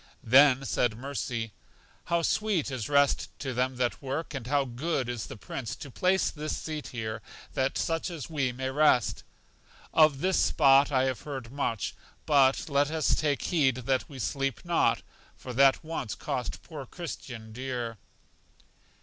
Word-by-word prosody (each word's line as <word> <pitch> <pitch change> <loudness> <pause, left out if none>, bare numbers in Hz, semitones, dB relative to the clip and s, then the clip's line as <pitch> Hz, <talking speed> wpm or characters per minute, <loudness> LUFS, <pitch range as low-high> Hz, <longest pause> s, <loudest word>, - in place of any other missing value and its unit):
Then 135 +2 +6
said 110 -2 0
Mercy: 120 -4 -4 0.5
How 170 0 +1
sweet 200 -7 +1
is 130 -3 -4
rest 140 -1 +3
to 135 -2 -4
them 130 +1 0
that 125 -1 -1
work! 140 +4 -4
And 130 -4 -5
how 140 0 +2
good 130 +2 -2
is 120 -3 -4
the - - -8
Prince 115 +2 -5
to 140 - -9
place 185 +7 +2
this 155 0 -4
seat 155 -2 -5
here 110 -2 -4 0.3
that 135 0 0
such 165 +2 -1
as 165 -6 -6
we 140 -6 0
may 130 +1 -3
rest! 135 -5 +3 0.7
Of 155 -4 +5
this 190 0 +2
spot 135 +1 +5
I 130 -2 +3
have 130 -2 -1
heard 135 -5 -6
much, 115 - -2 0.3
but 135 -3 +4
let 145 -1 +2
us 160 -1 +1
take 145 -2 0
heed 145 -8 +2
that 130 +1 -1
we 140 - -9
sleep 135 +1 -2
not, 170 -1 +2 0.3
for 125 - -8
that 135 +2 +5
once 155 -8 -4
cost 125 - -4
poor 150 -6 -8
Christian 125 -10 -7
dear. 120 -3 -4
135 Hz, 160 wpm, -29 LUFS, 125-150 Hz, 0.7 s, Then